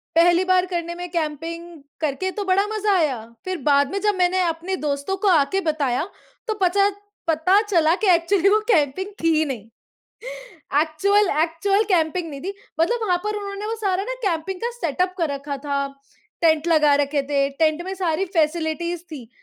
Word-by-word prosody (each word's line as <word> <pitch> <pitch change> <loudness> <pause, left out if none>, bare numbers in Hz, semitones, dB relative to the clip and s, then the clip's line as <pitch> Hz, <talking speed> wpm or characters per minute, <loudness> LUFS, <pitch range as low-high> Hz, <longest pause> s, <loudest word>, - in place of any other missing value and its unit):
पहली 345 +2 +5
बार 370 0 +3
करने 345 -2 -4
में 355 0 -6
कैम्पिंग 330 +1 -3 0.4
करके 315 +5 -1
तो 410 - -1
बड़ा 385 +2 +3
मज़ा 425 -1 0
आया। 290 -8 +1 0.3
फ़िर 370 0 -2
बाद 285 -1 +3
में 395 - -1
जब 420 -1 +2
मैंने 370 0 +2
अपने 340 +2 -2
दोस्तों 285 +7 -1
को - - +3
आके 345 +1 +3
बताया 305 -3 0 0.4
तो 435 - 0
पचा 395 +2 +3 0.4
पता 335 +5 +3
चला 340 -6 +2
कि - - +3
एक्चुअली 355 +2 +3
वो 425 +2 +4
कैम्पिंग 310 +2 +1 0.2
थी 330 -1 +4
ही 310 - +3
नहीं। 250 -8 -5 1.2
एक्चुअल 385 +6 +2
एक्चुअल 390 +5 +1
कैम्पिंग 330 0 +1
नहीं 280 -2 -7
थी 390 +2 -4 0.3
मतलब 470 +9 +2
वहाँ 360 -2 +2
पर 425 0 -2
उन्होंने 400 0 -5
वो 445 - -2
सारा 390 -3 -1
ना - - -3
कैम्पिंग 360 +2 -2
का 475 - -1
सेटअप 365 - -2
कर 330 -3 +1
रखा 280 0 -4
था, 280 0 -2 0.6
टेंट 320 -1 +3
लगा 305 -3 +4
रखे 285 0 +1
थे, 275 0 0
टेंट 310 +3 +1
में 380 +1 -4
सारी 360 -1 0
फ़ैसिलिटीज़ 330 +1 0
थी 255 -7 -8
340 Hz, 180 wpm, -22 LUFS, 305-385 Hz, 1.2 s, पहली